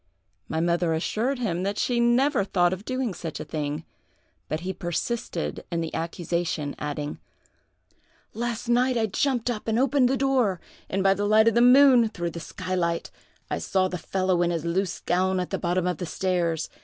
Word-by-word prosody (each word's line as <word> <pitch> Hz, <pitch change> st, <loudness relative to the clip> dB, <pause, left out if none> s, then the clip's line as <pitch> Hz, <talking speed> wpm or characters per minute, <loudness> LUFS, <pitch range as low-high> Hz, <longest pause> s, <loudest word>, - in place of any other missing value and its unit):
My 160 Hz, -, -2 dB
mother 170 Hz, 0 st, +1 dB
assured 230 Hz, +11 st, -1 dB
him 190 Hz, -8 st, -1 dB
that 200 Hz, +2 st, -2 dB
she 245 Hz, -1 st, +1 dB
never 240 Hz, +1 st, +3 dB
thought 180 Hz, -2 st, +2 dB
of 190 Hz, +3 st, -7 dB
doing 255 Hz, -4 st, -2 dB
such 165 Hz, -3 st, -6 dB
a -, -, -5 dB
thing; 150 Hz, 0 st, -4 dB, 0.6 s
but 155 Hz, -, -2 dB
he 190 Hz, +2 st, -3 dB
persisted 175 Hz, -, -3 dB
in 170 Hz, -1 st, -1 dB
the 165 Hz, -, -4 dB
accusation, 165 Hz, -3 st, -2 dB
adding: 150 Hz, 0 st, -4 dB, 1.1 s
'Last 235 Hz, 0 st, -3 dB
night 245 Hz, +1 st, +2 dB
I 225 Hz, -, +2 dB
jumped 245 Hz, +3 st, 0 dB
up 215 Hz, -2 st, -6 dB
and 220 Hz, 0 st, +1 dB
opened 265 Hz, 0 st, +3 dB
the 270 Hz, -, +1 dB
door, 255 Hz, -9 st, +1 dB, 0.3 s
and, 195 Hz, 0 st, 0 dB
by 195 Hz, 0 st, +5 dB
the 205 Hz, +1 st, -1 dB
light 215 Hz, +1 st, +5 dB
of 230 Hz, -, +5 dB
the 235 Hz, -, +4 dB
moon 250 Hz, -2 st, +7 dB
through 175 Hz, -5 st, -4 dB
the 170 Hz, -, -6 dB
skylight, 170 Hz, 0 st, -2 dB, 0.4 s
I -, -, -1 dB
saw 185 Hz, -, +1 dB
the 180 Hz, -, -4 dB
fellow 185 Hz, +1 st, 0 dB
in 175 Hz, -, +2 dB
his 170 Hz, -2 st, -2 dB
loose 180 Hz, +2 st, -1 dB
gown 185 Hz, +1 st, +1 dB
at 180 Hz, -, -3 dB
the -, -, -1 dB
bottom 175 Hz, +1 st, 0 dB
of 180 Hz, -3 st, -1 dB
the 180 Hz, -, -5 dB
stairs. 170 Hz, -3 st, -1 dB
185 Hz, 190 wpm, -26 LUFS, 170-235 Hz, 1.1 s, moon